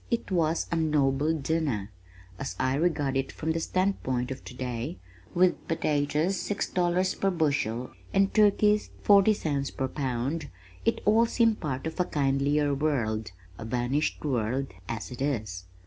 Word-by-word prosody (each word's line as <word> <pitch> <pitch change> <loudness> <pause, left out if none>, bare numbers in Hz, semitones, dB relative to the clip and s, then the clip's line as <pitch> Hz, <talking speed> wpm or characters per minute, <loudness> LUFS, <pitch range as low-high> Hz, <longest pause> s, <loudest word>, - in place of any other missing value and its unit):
It 235 -4 -2
was 165 -2 +1
a - - +1
noble 150 -2 +2
dinner! 145 -9 -1 0.5
As 135 - -4
I 130 0 +1
regard 145 -3 +1
it 135 0 -1
from 160 - -2
the 165 - 0
standpoint 150 -9 -1
of 130 - -6
today, 125 -5 -5 0.4
with 180 +1 +2
potatoes 155 +3 +1
six 205 +4 -2
dollars 180 +1 +1
per 195 - 0
bushel 140 - 0 0.2
and 195 0 +2
turkeys 210 0 +4
forty 205 +1 +6
cents 140 -6 -1
per 135 - -2
pound, 135 +3 -2 0.4
it - - +1
all 225 +3 +5
seems 225 -2 +3
part 135 -3 -4
of 160 +2 -5
a 180 - +3
kindlier 145 0 +1
world, 120 -8 -1 0.3
a - - -5
vanished 125 +7 -1
world 130 0 -1 0.2
as 115 0 -4
it 125 - -7
is! 110 -10 -2
145 Hz, 150 wpm, -28 LUFS, 130-175 Hz, 0.5 s, forty